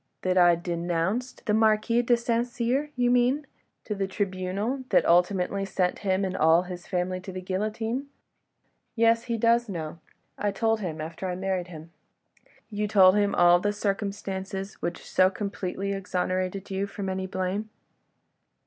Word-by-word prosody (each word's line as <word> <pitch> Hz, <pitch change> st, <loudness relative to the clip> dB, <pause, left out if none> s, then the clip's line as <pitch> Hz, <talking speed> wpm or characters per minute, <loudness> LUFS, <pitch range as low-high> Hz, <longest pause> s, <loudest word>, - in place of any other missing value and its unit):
"That 185 Hz, 0 st, +1 dB
I 175 Hz, -1 st, +6 dB
denounced 175 Hz, +7 st, -2 dB
the 210 Hz, -, +1 dB
Marquis 220 Hz, +2 st, +3 dB
de 240 Hz, 0 st, +3 dB
St. 235 Hz, 0 st, 0 dB
Cyr, 250 Hz, +5 st, -1 dB
you 245 Hz, -1 st, +2 dB
mean, 250 Hz, +4 st, +2 dB, 0.4 s
to 210 Hz, -, -3 dB
the 195 Hz, -1 st, -2 dB
tribunal 195 Hz, +6 st, -2 dB
that -, -, +4 dB
ultimately 180 Hz, +3 st, +2 dB
sent 185 Hz, -2 st, -1 dB
him 195 Hz, -1 st, 0 dB
and 190 Hz, 0 st, -3 dB
all 165 Hz, +1 st, +4 dB
his 180 Hz, -1 st, -8 dB
family 185 Hz, 0 st, -1 dB
to 185 Hz, +1 st, -8 dB
the 185 Hz, -, -5 dB
guillotine? 215 Hz, +7 st, -2 dB, 0.9 s
Yes, 230 Hz, 0 st, +3 dB
he 235 Hz, -2 st, -1 dB
does 235 Hz, +1 st, +3 dB
know.... 165 Hz, -3 st, -5 dB, 0.4 s
I 205 Hz, -, +1 dB
told 225 Hz, +2 st, +1 dB
him 165 Hz, -6 st, -4 dB
after 165 Hz, +4 st, -5 dB
I 180 Hz, -, -2 dB
married 185 Hz, -1 st, -2 dB
him... 165 Hz, -1 st, -11 dB, 0.4 s
." -, -, -32 dB
"You 210 Hz, 0 st, -1 dB
told 190 Hz, -3 st, +6 dB
him 205 Hz, -1 st, +2 dB
all 175 Hz, 0 st, +6 dB
the 205 Hz, +3 st, 0 dB
circumstances—which 195 Hz, -3 st, -4 dB
so 185 Hz, 0 st, +4 dB
completely 195 Hz, 0 st, -3 dB
exonerated 185 Hz, 0 st, -2 dB
you 195 Hz, +1 st, -1 dB
from 200 Hz, 0 st, -6 dB
any 190 Hz, 0 st, -2 dB
blame?" 190 Hz, +3 st, -3 dB
195 Hz, 160 wpm, -27 LUFS, 185-220 Hz, 0.9 s, I